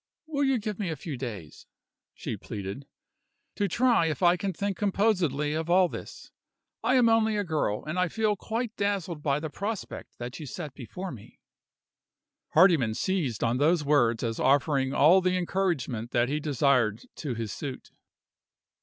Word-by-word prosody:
"Will 290 -2 -1
you 270 -2 +3
give 215 -2 -4
me 195 -4 -1
a 160 - -2
few 155 -2 -6
days," 105 - -7 0.5
she - - -4
pleaded, 100 +7 -7 0.7
"to 205 - 0
try 235 -3 +3
if 155 +2 -2
I 175 0 +6
can 195 +1 -2
think 200 +2 -2
composedly 185 - +1
of 160 +1 -3
all 180 +1 +5
this? - - -9 0.5
I 255 - +3
am 245 -2 +5
only 220 -1 +3
a 205 - 0
girl, 155 - -1
and 155 +4 -2
I 180 - +3
feel 215 +2 0
quite 225 +3 -4
dazzled 195 -6 -2
by 145 -1 +1
the 155 -1 -5
prospect 205 +3 -5
that 120 +4 -6
you 150 - -7
set 150 +1 -6
before 180 +9 -7
me." 115 -7 -13 1.2
Hardyman 155 - +5
seized 155 - -1
on 115 +1 +1
those 155 +1 +3
words 120 -6 +3
as 115 -1 -2
offering 135 -1 +2
all 165 +8 +6
the 185 0 +1
encouragement 165 - -1
that 120 0 +1
he 150 +2 0
desired 130 -6 +1
to 140 -6 -3
his 110 -2 -4
suit. 135 -4 -7
160 Hz, 170 wpm, -28 LUFS, 130-195 Hz, 1.2 s, I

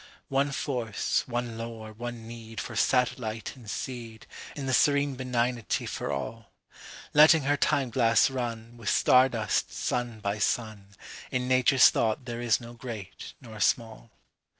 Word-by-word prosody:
One 140 +1 +1
force, 125 -6 -1
one 120 -2 -3
lore, 115 -1 -7
one 120 0 -7
needFor 115 0 -7
satellite 115 -2 0
and 120 -5 -12
seed, 115 -3 -6 0.3
In 140 - -5
the 130 - -1
serene 145 +1 +3
benignity 125 -2 -1
for - - -4
all. 110 +10 -5 0.6
Letting 155 +1 +7
her 145 +2 +2
time 135 -3 +1
glass 115 -2 +4
runWith 115 -3 -5
star 130 +4 +5
dust, 115 -4 -1
sun 120 -2 -2
by 100 0 -2
sun, 105 -3 -2 0.3
In 125 -1 -2
Nature's 130 0 +6
thought 110 +3 0
there 120 -1 -5
is 120 -2 +2
no 120 -1 -10
great 115 -5 -8
nor 110 -4 -11
small. 115 +2 0
120 Hz, 140 wpm, -28 LUFS, 110-130 Hz, 0.6 s, Letting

